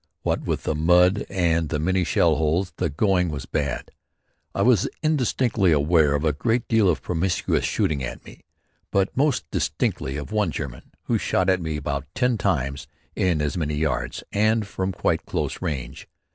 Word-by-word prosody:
What - - 0
with - - -2
the - - 0
mud 90 +5 +3
and 85 -4 +1
the 75 - -1
many 90 +4 +1
shell 85 -1 +3
holes, 80 +4 0
the 90 - 0
going 90 +3 +1
was 70 -4 -5
bad. 70 -4 -3 0.6
I - - +1
was 120 -6 +4
indistinctly 125 - +2
aware 75 0 +3
of 75 +2 -1
a 75 - +2
great 115 - 0
deal 110 -4 +3
of 85 - 0
promiscuous 90 +1 0
shooting 70 -4 0
at - - -6
me, - - -13 0.5
but 100 0 0
most 140 0 +1
distinctly 70 +2 -1
of 75 +7 -7
one 105 -4 +1
German 70 -6 -6
who - - 0
shot 95 0 +1
at 95 -1 +1
me 80 -2 -3
about 70 0 -3
ten 125 -3 +1
times 70 -7 -1 0.3
in 85 -5 +1
as 75 - -1
many 75 -3 -1
yards 75 -5 -2
and 110 +1 +2
from 95 -1 -3
quite 90 - 0
close - - -3
range. 70 -9 -4
85 Hz, 175 wpm, -24 LUFS, 75-100 Hz, 0.6 s, was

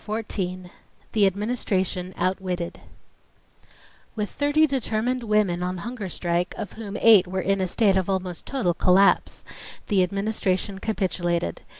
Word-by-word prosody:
Chapter 210 - -6
14 185 -5 -3 0.4
The 205 -3 +4
Administration 190 -3 -1
Outwitted 185 -1 -2 1.4
With 210 -2 -3
thirty 290 +2 +3
determined 250 -3 -1
women 210 -6 +1
on 180 +1 -2
hunger 220 +1 -5
strike, 175 +1 -1
of 205 - -5
whom 215 -2 -6
eight 210 -5 +7
were 190 +1 -3
in 195 +1 0
a 185 - 0
state 195 0 +2
of 190 0 -1
almost 185 -2 -3
total 245 -11 0
collapse, 185 +3 +3 0.5
the 200 -4 +3
Administration 195 0 -1
capitulated. 175 - -1
195 Hz, 130 wpm, -24 LUFS, 180-215 Hz, 1.4 s, eight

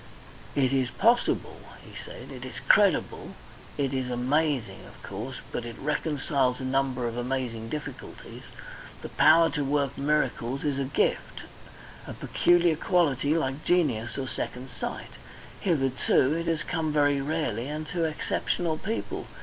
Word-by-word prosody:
"It 135 -2 +2
is 130 -2 +2
possible," 230 - +1 0.3
he - - -13
said. - - -9
"It - - -8
is - - -8
credible. - - +3 0.4
It 140 -2 0
is 130 -1 -1
amazing, 130 +1 0
of - - -15
course, 110 +7 -6 0.2
but 120 - -3
it 115 -1 -7
reconciles 140 -3 0
a - - -5
number 130 -1 0
of 115 0 -4
amazing 120 -3 -3
difficulties. 150 +4 -7 0.6
The - - -5
power 165 +1 +5
to 150 - -1
work 140 -1 0
miracles 140 -3 0
is 145 -2 0
a 135 - 0
gift 135 - -1 0.7
a - - -5
peculiar 175 -2 +3
quality 155 -4 +2
like 135 -1 -2
genius 135 -11 +1
or 135 -1 -3
second 125 +1 -5
sight; - - -5 0.5
hitherto 135 -4 +2
it 165 +1 -2
has 165 -2 0
come 160 -2 -1
very 145 -2 +3
rarely 135 -6 -2
and 155 +1 -4
to 170 0 0
exceptional 160 +1 -1
people. 225 +3 -4
140 Hz, 145 wpm, -27 LUFS, 130-155 Hz, 0.7 s, power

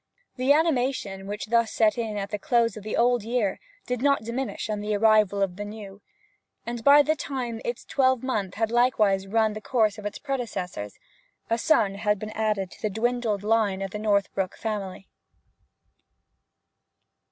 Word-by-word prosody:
The 255 +2 +2
animation 260 - +1
which 205 +1 -4 0.2
set 220 -1 +2
in 225 -3 -3
thus 205 - -2
at 200 - -20
the 210 - -3
close 230 -1 +2
of 215 - -9
the 215 - -3
old 245 0 +3
year 225 -3 -1 0.3
did 250 -1 -3
not 280 -4 +2
diminish 240 +4 -4
on 215 -1 -2
the 210 0 -1
arrival 210 -2 +4
of 185 -2 -3
the 205 - -4
new; 205 -1 -9 0.6
and 235 -1 -5
by 290 +3 +7
the 310 +2 +1
time 245 -6 -4
its 240 0 -4
twelve 260 -3 +2
months 205 -8 -2
had 225 0 0
likewise 215 -6 +2
run 220 +1 +2
the 215 - -7
course 215 -2 +1
of 210 - -10
its 205 - -6
predecessors, 215 - -4 0.5
a 230 - +2
son 215 -8 +3
had 210 +1 0
been 215 +2 -6
added 210 -4 -1
to - - -15
the 215 - 0
dwindled 220 -1 -1
line 210 -3 +1
of 195 - -5
the 210 - -5
Northbrook 200 -3 0
family. 195 -4 -4
215 Hz, 175 wpm, -26 LUFS, 205-240 Hz, 0.6 s, by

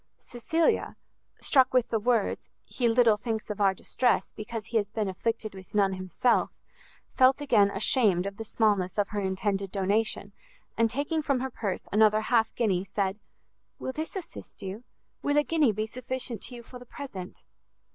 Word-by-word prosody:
Cecilia, 320 +7 0 0.4
struck 260 -3 +3
with 250 -2 +3
the 225 - +1
words, 230 -1 +1 0.2
he 245 - -1
little 230 -2 +4
thinks 220 -1 -3
of 210 - -5
our 195 -1 +4
distress, 245 +5 0
because 215 0 -6
he 230 - -1
has 205 -2 0
been 215 -1 -2
afflicted 215 +3 -2
with 190 +1 -12
none 195 -2 +3
himself, 185 +6 +1 0.6
felt 260 +2 +5
again 225 -9 +4
ashamed 200 -2 +2
of 200 0 -5
the 225 - -5
smallness 205 -4 +1
of 205 -1 +1
her 210 - -2
intended 195 0 -1
donation, 205 +3 0 0.4
and 230 0 +3
taking 290 +6 -1
from 280 -3 0
her 265 0 -3
purse 200 -6 -4
another 215 +1 +4
half 225 -1 +1
guinea, 195 -6 +1
said, 195 +1 -2 0.6
"Will - - -4
this 315 +7 -5
assist 375 -4 -7
you? 195 +5 -6 0.4
Will 290 0 +1
a 295 - +5
guinea 305 -6 +3
be 215 +1 -2
sufficient 250 -1 -5
to 250 - -8
you 240 - -10
for 250 +2 -11
the 250 - -12
present?" 200 -12 -8
220 Hz, 175 wpm, -28 LUFS, 200-250 Hz, 0.6 s, felt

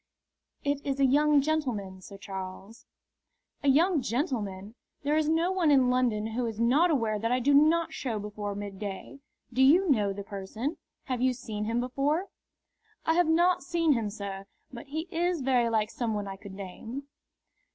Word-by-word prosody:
"It 285 0 -1
is 275 -1 -2
a 275 - +5
young 290 +2 +4
gentleman, 245 -11 -2
Sir 200 +2 -11
Charles." 195 +2 -8 0.7
"A - - -2
young 315 +3 +4
gentleman? 220 - -3 0.3
There 290 +2 +1
is 310 -1 +2
no 330 +3 +2
one 365 -4 +2
in 260 -3 +5
London 240 -4 +1
who 245 +1 -1
is 225 -1 -5
not 275 +10 +4
aware 225 -8 +1
that 230 +2 -1
I 250 - +2
do 280 +3 +2
not 315 +3 +4
show 245 -7 -3
before 205 -1 -5
midday. 200 +5 -6 0.3
Do 260 - +1
you 325 +6 +5
know 210 -6 +2
the 200 +1 -6
person? 210 - -5 0.3
Have 255 -2 -3
you 255 0 +3
seen 215 -4 -5
him 230 +2 0
before?" 280 +9 -1 0.8
"I 320 - +3
have 350 0 +3
not 350 +2 +3
seen 335 -3 +2
him, 225 -4 -1
sir, 200 -2 -6 0.3
but 250 +4 -9
he 310 +3 -3
is 345 -1 0
very 250 -3 +2
like 220 -1 0
some 230 -3 -2
one 205 -1 -3
I 195 - -5
could 195 0 -11
name." 210 +7 -7
250 Hz, 180 wpm, -28 LUFS, 210-300 Hz, 0.8 s, a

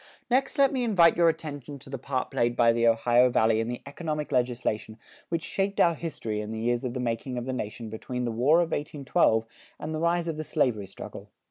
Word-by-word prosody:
Next 270 +4 +1
let 275 0 +4
me 255 -2 0
invite 185 -8 +5
your 170 -1 +5
attention 145 -3 -5
to 135 +1 -14
the 135 - -4
part 130 0 -3
played 120 0 +1
by 115 -1 +5
the 115 0 +2
Ohio 120 +2 +4
Valley 110 -2 +3
in 115 - -1
the 120 0 -5
economic 150 +1 -4
legislation 120 -4 -1 0.3
which 165 -1 -2
shaped 195 0 -2
our 170 - +5
history 125 -10 -4
in 105 +1 -6
the 110 - -4
years 120 +1 0
of 125 -1 -3
the - - -2
making 125 +1 -2
of 120 - -3
the 130 - -3
nation 115 -1 -5
between 125 +3 -4
the 120 - -1
War 140 +9 +4
of 170 - -1
1812 135 -6 +1 0.3
and 155 - -5
the 155 - -2
rise 170 +1 +1
of 160 -2 -3
the 155 - -3
slavery 110 -9 0
struggle. 95 - -10
130 Hz, 225 wpm, -27 LUFS, 115-160 Hz, 0.3 s, invite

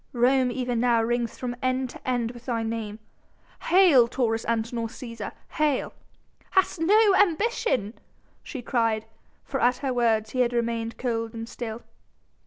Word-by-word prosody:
Rome 255 +1 +3
even 245 -1 -2
now 235 -1 +3
rings 235 0 -1
from 245 -1 -4
end 255 0 0
to - - -7
end 240 -2 0
with 240 0 -14
thy 230 -2 -1
name: 225 -2 -4 0.7
'Hail 335 -9 +6
Taurus 230 -2 -1
Antinor 230 0 -1
Cæsar! 230 -2 -7 0.2
Hail!'... 300 -3 0 0.6
Hast 380 -2 +2
no 410 +5 +5
ambition?" 380 - +1 0.5
she 260 -5 -7
cried, 225 -3 0 0.4
for 270 - -3
at 245 +1 +3
her 260 - 0
words 220 -3 +1
he 255 - -3
had 245 -1 +2
remained 230 -1 -2
cold 230 -2 -2
and 225 0 -5
still. 230 -1 -6
240 Hz, 150 wpm, -26 LUFS, 230-260 Hz, 0.7 s, Hail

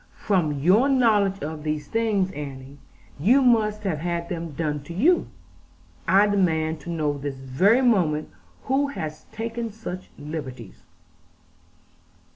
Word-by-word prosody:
'From 180 -8 +1
your 185 - +3
knowledge 210 -7 +3
of 155 +1 -5
these 150 0 -3
things, 215 -4 0
Annie, 140 -2 -8 0.4
you 230 - +5
must 215 -4 +3
have 180 -7 -1
had 170 +1 -3
them 170 -3 -4
done 150 -1 -2
to 170 - -8
you. 330 - +3 0.8
I 195 +2 +6
demand 160 -6 +1
to 150 - -10
know 150 -4 -1
this 140 -1 -4
very 160 - +3
moment 175 -11 +2 0.3
who 275 +2 +1
has 155 - -6
taken 230 +1 -4
such 195 -4 -7
liberties.' 130 -8 -7
175 Hz, 130 wpm, -24 LUFS, 150-215 Hz, 0.8 s, I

